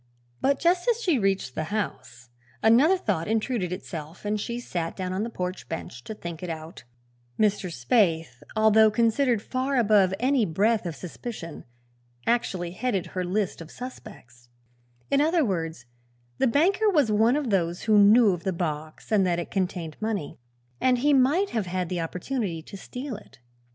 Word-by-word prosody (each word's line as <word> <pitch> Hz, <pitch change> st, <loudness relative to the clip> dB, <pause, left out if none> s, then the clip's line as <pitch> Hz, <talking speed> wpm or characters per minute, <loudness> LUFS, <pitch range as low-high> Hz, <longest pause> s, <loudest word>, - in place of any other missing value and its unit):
But 275 Hz, 0 st, +2 dB
just 355 Hz, -, +2 dB
as 470 Hz, -1 st, +2 dB
she 345 Hz, -, +1 dB
reached 195 Hz, -, 0 dB
the 155 Hz, -, -3 dB
house 130 Hz, -, -5 dB, 0.3 s
another 260 Hz, +12 st, +5 dB
thought 185 Hz, -, -1 dB
intruded 220 Hz, -4 st, -1 dB
itself 170 Hz, -2 st, -7 dB
and 210 Hz, 0 st, -1 dB
she 235 Hz, +3 st, -4 dB
sat 170 Hz, -8 st, -4 dB
down 185 Hz, -1 st, -3 dB
on 190 Hz, -, -1 dB
the 230 Hz, -, -2 dB
porch 185 Hz, -4 st, -5 dB
bench 120 Hz, -6 st, -6 dB
to 220 Hz, -, -6 dB
think 170 Hz, -4 st, -7 dB
it 180 Hz, -, -5 dB
out. 160 Hz, -2 st, -7 dB, 0.5 s
Mr. 205 Hz, -4 st, +1 dB
Spaythe, 160 Hz, -, +1 dB
although 220 Hz, 0 st, +6 dB
considered 230 Hz, +1 st, +2 dB
far 260 Hz, +2 st, -1 dB
above 205 Hz, -5 st, +4 dB
any 260 Hz, 0 st, +2 dB
breath 205 Hz, +3 st, +1 dB
of 165 Hz, -, -5 dB
suspicion, 175 Hz, -, -8 dB, 0.6 s
actually 190 Hz, -7 st, 0 dB
headed 195 Hz, -1 st, -1 dB
her 185 Hz, -, -1 dB
list 190 Hz, +1 st, -1 dB
of 160 Hz, -, -9 dB
suspects. 125 Hz, -, -11 dB, 0.6 s
In 280 Hz, -, +4 dB
other 320 Hz, 0 st, +3 dB
words, 165 Hz, -, -3 dB, 0.5 s
the 265 Hz, -, +3 dB
banker 365 Hz, -, +3 dB
was 295 Hz, -, +3 dB
one 220 Hz, +4 st, +4 dB
of 285 Hz, -6 st, -1 dB
those 175 Hz, -3 st, 0 dB
who 215 Hz, -2 st, +5 dB
knew 210 Hz, +2 st, +7 dB
of 170 Hz, -1 st, -6 dB
the 190 Hz, -, 0 dB
box 155 Hz, 0 st, -5 dB
and 210 Hz, -3 st, +4 dB
that 175 Hz, -1 st, +1 dB
it 170 Hz, -, -5 dB
contained 180 Hz, -5 st, -2 dB
money, 210 Hz, -12 st, -3 dB, 0.4 s
and 255 Hz, -1 st, +3 dB
he 290 Hz, +4 st, +3 dB
might 290 Hz, +10 st, +3 dB
have 215 Hz, -5 st, -1 dB
had 180 Hz, -1 st, -2 dB
the 180 Hz, -2 st, -2 dB
opportunity 180 Hz, 0 st, -3 dB
to 200 Hz, -, -11 dB
steal 250 Hz, +5 st, -6 dB
it. 210 Hz, -, -14 dB
205 Hz, 170 wpm, -26 LUFS, 170-245 Hz, 0.6 s, knew